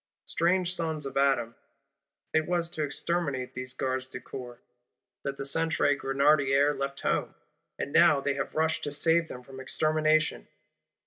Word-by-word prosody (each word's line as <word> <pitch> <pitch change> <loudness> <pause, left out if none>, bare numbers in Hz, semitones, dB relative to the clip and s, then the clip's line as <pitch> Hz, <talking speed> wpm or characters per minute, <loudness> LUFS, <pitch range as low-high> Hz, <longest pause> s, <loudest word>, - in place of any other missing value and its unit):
Strange 180 +1 +1
Sons 160 -4 -2
of 135 -1 -6
Adam! 135 -4 +2 0.8
It 160 0 +2
was 170 -1 0
to 160 - -4
"exterminate" 145 -3 -1
these 125 0 -4
Gardes 130 0 -2
du - - -6
Corps 120 -2 -9 0.6
that 140 0 -4
the 140 - -4
Centre 160 0 +2
Grenadiers 140 +1 +3
left 140 0 -3
home: - - -1 0.4
and 140 - -4
now 165 -4 +6
they 140 0 0
have 140 - -4
rushed 160 0 +1
to 145 - -3
save 165 +3 +2
them 125 -4 -9
from 130 +1 -11
extermination. 155 - +1
145 Hz, 150 wpm, -28 LUFS, 135-160 Hz, 0.8 s, now